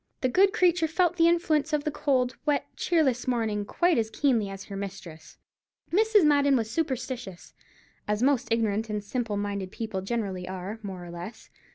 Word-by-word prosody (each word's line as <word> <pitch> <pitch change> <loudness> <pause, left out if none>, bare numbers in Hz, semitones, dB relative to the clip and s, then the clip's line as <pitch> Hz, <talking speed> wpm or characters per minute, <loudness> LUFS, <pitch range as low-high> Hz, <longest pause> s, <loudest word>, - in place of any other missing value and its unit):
The 255 - +2
good 385 +9 +4
creature 355 -5 +3
felt 355 +2 +1
the 330 -1 +5
influence 320 -3 +1
of 295 -1 +1
the 300 - -1
cold, 255 -4 0
wet, 295 -1 +1
cheerless 275 -9 +1
morning 220 -4 0
quite 345 - +2
as 220 -1 -1
keenly 235 -6 +1
as 195 0 -7
her 200 - -8
mistress. 190 -5 -8 0.6
Mrs. 430 0 +4
Madden 285 -2 +4
was 225 -3 -1
superstitious, 255 - -4 0.5
as 210 +2 0
most 270 -3 +2
ignorant 220 -1 0
and 210 -1 -3
simple 220 -1 -2
minded 200 -2 -3
people 215 -4 -4
generally 195 -4 -3
are, 190 +4 -6
more 190 -4 -7
or 175 - -9
less. 175 +7 -9
235 Hz, 175 wpm, -27 LUFS, 200-300 Hz, 0.6 s, the